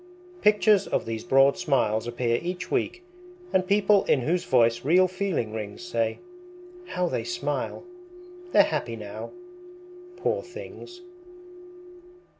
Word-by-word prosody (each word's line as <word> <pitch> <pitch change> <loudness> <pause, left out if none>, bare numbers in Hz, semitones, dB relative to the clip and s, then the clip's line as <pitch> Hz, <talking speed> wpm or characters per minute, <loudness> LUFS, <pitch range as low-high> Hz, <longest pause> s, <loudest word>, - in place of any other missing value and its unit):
Pictures 210 -1 +4
of - - -1
these 115 0 -4
broad 135 +5 +4
smiles 120 -9 +1
appear 120 0 0
each 180 +1 -5
week, 360 +2 -1 0.5
And 185 -1 +2
people 200 0 +4
in 135 - +2
whose 175 +7 0
voice 120 -6 +2
real 180 +6 +4
feeling 185 - -2
rings 105 - -6
Say: 115 -11 -1 0.7
How 180 - -1
they - - -2
smile! 360 0 -3 0.7
They're - - +7
happy - - -2
now, - - -7 0.9
poor 470 +7 -1
things. 360 -2 -11
180 Hz, 120 wpm, -26 LUFS, 120-200 Hz, 0.9 s, They're